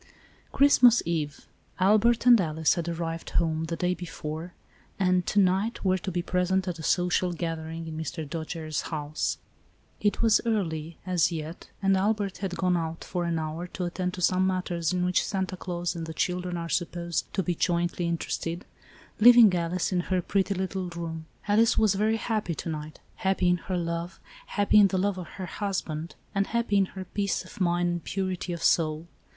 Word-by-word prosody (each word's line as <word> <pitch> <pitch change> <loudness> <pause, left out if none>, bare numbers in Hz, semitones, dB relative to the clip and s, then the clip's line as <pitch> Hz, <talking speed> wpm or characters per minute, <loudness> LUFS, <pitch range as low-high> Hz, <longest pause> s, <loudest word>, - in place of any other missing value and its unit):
Christmas 250 -4 +6
eve. 155 -4 -3 0.3
Albert 215 +5 +4
and 240 -4 +8
Alice 160 -2 +1
had 170 -1 -3
arrived 165 -1 -4
home, 160 -1 0
the 165 +1 -3
day 180 +2 0
before, 165 -1 -6 0.4
and, 185 -2 +2
to 205 - +2
night, 195 +4 +1
were 185 0 +3
to 190 - -4
be 175 0 -2
present 185 +1 0
at 175 -2 -3
a - - -5
social 180 +2 +1
gathering 165 -1 -4
in 160 - -6
Mr. 160 0 -4
Dojere's 160 0 -4
house. 150 -1 -2 0.6
It 205 +2 +1
was 225 -2 +5
early, 170 -8 -2
as 180 -2 +2
yet, 160 +1 -6
and 195 0 +4
Albert 200 0 0
had 190 -3 -3
gone 180 -1 +2
out, 165 -1 -3
for 175 -2 -3
an 170 -1 0
hour, 160 +2 -4
to 180 0 -4
attend 180 +1 -3
to 180 - -7
some 185 +2 +3
matters 175 -3 -1
in 180 -1 0
which 180 0 +2
Santa 190 -1 -2
Claus 175 -1 -3
and 165 -1 -5
the 160 - -7
children 180 +1 -1
are 170 0 -4
supposed 170 0 -2
to 190 - +1
be 175 - 0
jointly 175 0 0
interested, 170 +1 -3 0.5
leaving 235 -3 +8
Alice 175 +1 -1
in 180 - +1
her 185 +1 0
pretty 195 +1 0
little 190 0 -3
room. 165 -2 -6 0.2
Alice 220 +2 +4
was 215 -3 +4
very 215 +3 +1
happy 215 -7 -2
to 165 - -5
night, 155 -1 -6 0.2
happy 190 -1 +1
in 180 - +3
her 185 +1 -3
love, 170 +1 -3 0.3
happy 205 +1 +4
in 200 - +7
the 190 - -1
love 195 0 0
of 180 - -7
her 190 - -4
husband 170 -4 -4 0.2
and 200 -1 +1
happy 235 -3 +1
in 195 - +4
her 190 - -5
peace 200 -2 -2
of 185 - -11
mind 175 0 +2
and 175 -2 -3
purity 185 -2 -3
of 170 -1 -4
soul. 155 -1 +2
180 Hz, 190 wpm, -27 LUFS, 165-190 Hz, 0.6 s, and